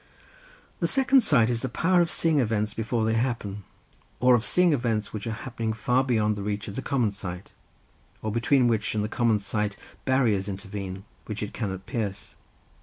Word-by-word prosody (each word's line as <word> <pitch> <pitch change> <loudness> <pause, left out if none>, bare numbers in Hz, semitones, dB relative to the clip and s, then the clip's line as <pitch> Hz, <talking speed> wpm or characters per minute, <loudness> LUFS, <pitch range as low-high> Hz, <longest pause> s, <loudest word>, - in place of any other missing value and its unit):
The - - +1
second 270 0 +4
sight 125 - +4
is 115 0 -2
a 130 - -1
power 175 +8 +3
of 170 - +1
seeing 160 -3 +2
events 105 -4 0
before 115 0 -1
they 110 - +1
happen, 115 -4 -2 0.6
or 125 0 +5
of 115 -2 +3
seeing 180 +2 +3
events 115 -6 -1
which 105 +1 -5
are - - -1
happening 115 -3 -2
far 125 +4 +1
beyond 110 -5 +1
the 100 - -5
reach 105 +1 -3
of 100 - -6
the - - -3
common 125 -7 +1
sight, 95 -2 -7 0.7
or 110 - -1
between 125 +3 +3
which 110 -2 0
and 105 - +1
the - - -1
common 115 -1 +2
sight 105 0 -2 0.3
barriers 115 -7 +2
intervene, 95 -1 -6 0.2
which 105 -1 -3
it 105 - -5
cannot 95 -4 -4
pierce. 105 -5 -4
110 Hz, 185 wpm, -26 LUFS, 105-125 Hz, 0.7 s, or